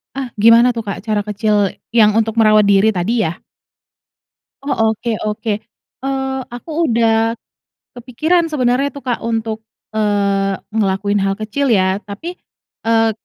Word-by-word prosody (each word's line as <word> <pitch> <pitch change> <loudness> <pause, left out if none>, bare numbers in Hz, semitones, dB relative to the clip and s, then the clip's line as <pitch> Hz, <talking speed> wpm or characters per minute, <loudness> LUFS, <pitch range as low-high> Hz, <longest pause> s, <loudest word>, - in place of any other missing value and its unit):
Ah, 270 -2 -4
gimana 230 +3 +6
tuh 230 -2 -3
Kak 200 - -5
cara 210 -1 -1
kecil, 210 -1 0 0.2
yang 215 -3 +4
untuk 225 +1 0
merawat 215 -2 +5
diri 200 +2 +4
tadi 215 +5 0
ya? 160 - -2 1.3
Oh, 225 -6 +1
oke 225 0 -3
oke. 215 +1 -2 0.5
Eee, 265 0 -2 0.2
aku 245 +7 -8 0.2
udah 225 0 +2 0.6
kepikiran 310 +8 0
sebenarnya, 265 -1 +1
tuh 280 -1 -11
Kak 245 -2 -2
untuk, 225 -1 -2 0.3
eee, 200 -2 +1 0.2
ngelakuin 205 -1 0
hal 195 0 0
kecil 225 +6 -2
ya, 190 -2 +2
tapi, 320 - -8 0.4
eee, 225 0 +2
225 Hz, 135 wpm, -17 LUFS, 205-245 Hz, 1.3 s, gimana